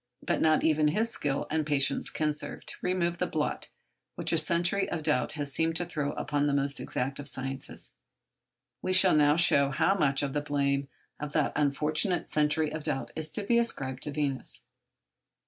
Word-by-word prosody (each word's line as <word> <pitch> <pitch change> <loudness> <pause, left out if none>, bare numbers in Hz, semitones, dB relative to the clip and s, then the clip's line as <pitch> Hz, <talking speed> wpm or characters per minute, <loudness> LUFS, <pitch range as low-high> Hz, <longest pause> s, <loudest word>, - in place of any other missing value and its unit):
But - - 0
not 155 -1 +3
even 155 -1 +3
his 220 +9 +1
skill 140 -1 -1
and 160 0 +1
patience 140 -2 +1
can 155 -1 -1
serve 150 - -7
to - - -4
remove 175 -1 -1
the 180 - 0
blot 150 -1 -3 0.5
which - - -1
a - - +3
century 170 +5 +1
of 160 -3 -3
doubt 150 -5 +1
has 145 -3 -4
seemed 165 0 +1
to 175 - 0
throw 145 -3 -3
upon 145 0 -1
the 140 - +1
most 140 0 0
exact 135 +3 -3
of 145 - -6
the - - 0
sciences. 135 +1 -6 0.9
We 185 - -1
shall 185 -2 +6
now 150 -1 +4
show 140 -4 +5
how 140 +7 +2
much 140 -7 +1
of 140 -1 -2
the 145 - 0
blame 140 -1 0 0.3
of 150 0 -6
that 150 -3 +1
unfortunate 150 +5 0
century 150 0 +1
of 155 - -4
doubt 135 -6 -3
is 160 -1 -1
to 210 - 0
be 235 +3 +3
ascribed 135 - -2
to 150 - -4
Venus. 140 -2 -3
150 Hz, 195 wpm, -29 LUFS, 140-165 Hz, 0.9 s, shall